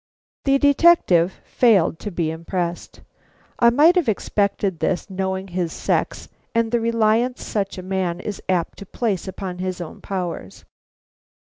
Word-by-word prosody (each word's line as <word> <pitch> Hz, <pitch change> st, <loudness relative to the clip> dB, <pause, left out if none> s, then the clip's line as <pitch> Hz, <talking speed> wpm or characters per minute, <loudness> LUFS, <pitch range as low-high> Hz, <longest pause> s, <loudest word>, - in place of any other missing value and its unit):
The 275 Hz, 0 st, +4 dB
detective 285 Hz, -, +4 dB
failed 195 Hz, -9 st, +3 dB
to 210 Hz, -, -5 dB
be 170 Hz, -4 st, -2 dB
impressed. 170 Hz, +1 st, -4 dB, 0.6 s
I 235 Hz, -, +6 dB
might 300 Hz, +9 st, +5 dB
have 350 Hz, -10 st, +2 dB
expected 200 Hz, -3 st, -1 dB
this, 185 Hz, +2 st, -1 dB
knowing 190 Hz, 0 st, -3 dB
his 175 Hz, -2 st, -2 dB
sex -, -, -2 dB, 0.3 s
and 230 Hz, -1 st, +1 dB
the 240 Hz, -, +2 dB
reliance 230 Hz, +2 st, +1 dB
such 195 Hz, -3 st, -2 dB
a 185 Hz, -, -6 dB
man 185 Hz, -2 st, -2 dB
is 205 Hz, +1 st, -6 dB
apt 180 Hz, -3 st, -1 dB
to 200 Hz, -, -10 dB
place 200 Hz, -6 st, -2 dB
upon 185 Hz, -1 st, -6 dB
his 185 Hz, -1 st, -3 dB
own 170 Hz, -3 st, -8 dB
powers. 175 Hz, -, -5 dB
190 Hz, 145 wpm, -22 LUFS, 180-230 Hz, 0.6 s, I